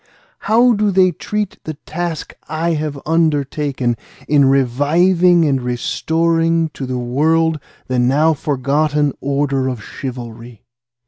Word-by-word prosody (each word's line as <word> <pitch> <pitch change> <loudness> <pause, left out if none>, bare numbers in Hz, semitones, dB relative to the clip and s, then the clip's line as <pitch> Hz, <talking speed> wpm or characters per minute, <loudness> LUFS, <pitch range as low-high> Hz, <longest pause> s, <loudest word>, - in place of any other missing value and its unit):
How 240 +3 +5
do 210 -1 +1
they 185 -1 +4
treat 210 +4 -4
the 155 - -6
task 165 +1 -5 0.2
I 160 +2 -1
have 150 -3 -3
undertaken 145 -5 0 0.3
in 145 -2 +4
reviving 160 +7 +3
and 135 -3 +1
restoring 165 +6 0
to 135 -3 -7
the 130 0 -3
world 155 +6 +1 0.3
the 130 -1 -1
now 145 +6 +3
forgotten 145 +1 0
order 140 -1 0
of 120 -5 -6
chivalry? 120 -3 -8
150 Hz, 120 wpm, -17 LUFS, 135-165 Hz, 0.3 s, How